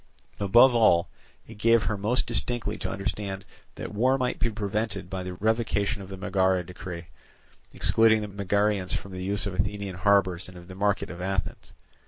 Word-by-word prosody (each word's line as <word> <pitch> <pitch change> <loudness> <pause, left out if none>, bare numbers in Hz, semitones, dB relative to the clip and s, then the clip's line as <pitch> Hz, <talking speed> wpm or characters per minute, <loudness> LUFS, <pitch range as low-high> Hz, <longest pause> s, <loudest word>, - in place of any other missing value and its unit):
Above 120 +6 +6
all, 110 -8 +4 0.4
it - - -12
gave 115 0 +4
her 110 - -1
most 110 +6 +1
distinctly 120 -3 -1
to 95 - -4
understand 95 0 -4 0.3
that - - -7
war 130 +6 +3
might 125 -1 -1
be 120 - +1
prevented 100 -3 -3
by 95 -1 -3
the 90 0 -6
revocation 110 +1 0
of 95 - -10
the 95 - -7
Megara 95 -1 +1
decree, 90 -1 -8 0.7
excluding 110 -1 +4
the - - -4
Megarians 100 -1 0
from 100 - -6
the 90 0 -6
use 100 0 -1
of 100 - -3
Athenian 95 0 -3
harbours 95 -2 +2
and 90 - -12
of 85 0 -12
the 95 - -9
market 100 +1 0
of 90 0 -8
Athens. 95 0 -3
100 Hz, 180 wpm, -27 LUFS, 95-110 Hz, 0.7 s, Above